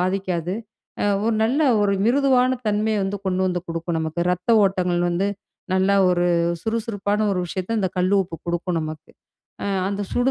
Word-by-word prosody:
பாதிக்காது. 185 -1 -1 0.7
1 230 - +2
நல்ல 255 +6 +1 0.2
1 200 -1 +2
மிருதுவான 260 0 +3
தன்மையை 210 +1 +1
வந்து 200 +1 -2
கொண்டு 185 0 0
வந்து 180 -1 -1
குடுக்கும் 165 0 -3
நமக்கு. 160 +2 -3
ரத்த 180 +4 -3 0.2
ஓட்டங்கள் 180 -2 +1
வந்து 180 +3 0 0.5
நல்லா 190 +1 +3 0.2
1 175 0 +1 0.4
சுறுசுறுப்பான 215 -2 -1
1 185 - -1
விஷயத்த 185 +6 -3
இந்த 190 - +1
கல்லுப்பு 185 -2 +1
குடுக்கும் 175 +1 -1
நமக்கு. 155 -1 -7 0.5
அ - - -2 0.2
அந்த 200 +1 -2
சுடு 245 +2 +2
190 Hz, 150 wpm, -22 LUFS, 175-215 Hz, 0.7 s, மிருதுவான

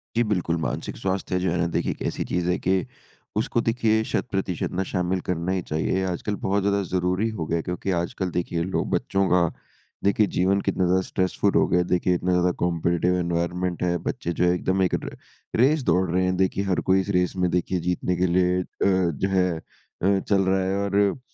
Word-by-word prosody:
जी, 120 - +3
बिल्कुल। 90 -6 0
मानसिक - - -3
स्वास्थ्य 95 -1 -2
है - - +2
जो 95 - +1
है 90 - 0
ना, 85 - +2
देखिए 85 - -1
एक - - -9
ऐसी - - -2
चीज़ 90 0 -1
है 90 - +2
कि 95 0 +1 0.5
उसको 120 - +1
देखिए 115 -1 +1
शत - - 0
प्रतिशत 95 -3 -2
ना 95 +1 0
शामिल 90 0 0
करना 90 +1 -2
ही 95 - 0
चाहिए। 85 +4 -1
आजकल 95 +3 -2
बहुत 100 +1 +1
ज़्यादा 100 0 +2
ज़रूरी 90 +4 +1
हो 80 - -1
गया 85 - 0
है - - -1
क्योंकि 90 +2 -3
आजकल 90 +1 -1
देखिए 85 -1 -1
लोग - - 0
बच्चों 95 0 +1
का 90 0 +4 0.6
देखिए 100 +1 +3
जीवन 95 +2 +2
कितना 95 - 0
ज़्यादा 95 +1 +3
स्ट्रेसफुल 95 +2 0
हो - - +5
गया 90 - +2
है, 90 - +1
देखिए 90 0 +2
इतना 90 +1 -1
ज़्यादा 90 0 +3
कॉम्पिटिटिव 85 +1 +1
एनवायरनमेंट 85 +1 -1
है, 85 0 +1
बच्चे 85 - -2
जो 90 - +4
है 90 - +4
एकदम 95 +1 0
एक 90 - +1
र - - -7 0.4
रेस 140 +2 +4
दौड़ 95 -4 +2
रहे 90 +1 +2
हैं। 90 0 +1
देखिए, 95 +1 +1
हर 95 -2 +1
कोई 95 +1 +5
इस 95 - -7
रेस 90 -1 +1
में 90 - +3
देखिए 90 +1 0
जीतने 90 0 0
के 90 +1 +1
लिए 90 0 +3
अ, - - -6 0.2
जो 95 -2 +1
है 95 -1 +2
अ, 95 +4 -2
चल 100 -1 +5
रहा 95 0 +2
है 95 +1 0
और 100 +3 +1
90 Hz, 220 wpm, -24 LUFS, 90-95 Hz, 0.6 s, हो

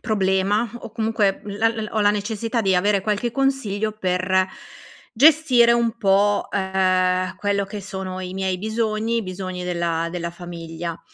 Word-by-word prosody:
problema 200 +1 +1
o - - -9
comunque 220 -3 0
la-l 220 +2 -1
ho 220 - 0
la 205 0 +5
necessità 220 +3 -2
di 195 -3 +2
avere 200 +2 +2
qualche 210 +4 -1
consiglio 230 -6 0
per 185 -2 +1 0.7
gestire 260 -3 +5
un 235 -1 +1
po', 205 -1 +2
ehm, 185 -1 +1
quello 200 +1 0
che 205 +1 -7
sono 190 -1 -6
i 185 0 -6
miei 190 -1 -1
bisogni, 220 +2 -1
bisogni 185 -1 -5
della 170 -2 -1
della 170 -1 -4
famiglia. 170 -1 -7
200 Hz, 140 wpm, -22 LUFS, 185-220 Hz, 0.7 s, la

